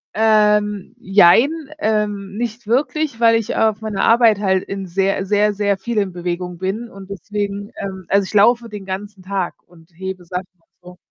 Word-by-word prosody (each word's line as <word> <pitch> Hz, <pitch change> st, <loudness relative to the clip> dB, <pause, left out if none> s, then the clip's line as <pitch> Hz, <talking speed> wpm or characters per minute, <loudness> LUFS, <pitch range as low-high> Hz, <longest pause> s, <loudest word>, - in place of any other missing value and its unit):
Ähm, 210 Hz, -1 st, +2 dB
jein, 200 Hz, -, +5 dB, 0.3 s
ähm, 205 Hz, -4 st, -1 dB
nicht 235 Hz, 0 st, -4 dB
wirklich, 275 Hz, +2 st, 0 dB
weil 230 Hz, -1 st, +5 dB
ich 225 Hz, -2 st, -1 dB
auf 220 Hz, -1 st, +2 dB
meiner 215 Hz, -3 st, -2 dB
Arbeit 230 Hz, -3 st, +5 dB
halt 190 Hz, -2 st, +1 dB
in 195 Hz, -1 st, -6 dB
sehr 195 Hz, +2 st, 0 dB
sehr, 205 Hz, +1 st, +2 dB
sehr 200 Hz, -1 st, 0 dB
viel 230 Hz, +3 st, -4 dB
in 195 Hz, -2 st, -1 dB
Bewegung 175 Hz, 0 st, -4 dB
bin 205 Hz, +6 st, -3 dB
und 195 Hz, 0 st, -12 dB
deswegen, 200 Hz, +1 st, -4 dB
ähm, 190 Hz, -2 st, -6 dB
also, 200 Hz, 0 st, +3 dB
ich -, -, -9 dB
laufe 230 Hz, +3 st, +4 dB
den 205 Hz, -2 st, -8 dB
ganzen 195 Hz, +1 st, -6 dB
Tag 190 Hz, -1 st, -3 dB
und 170 Hz, 0 st, -21 dB
hebe 185 Hz, 0 st, -7 dB
Sachen 180 Hz, +1 st, -5 dB
und 165 Hz, -, -40 dB
so. 180 Hz, 0 st, -14 dB
200 Hz, 180 wpm, -19 LUFS, 190-215 Hz, 0.3 s, jein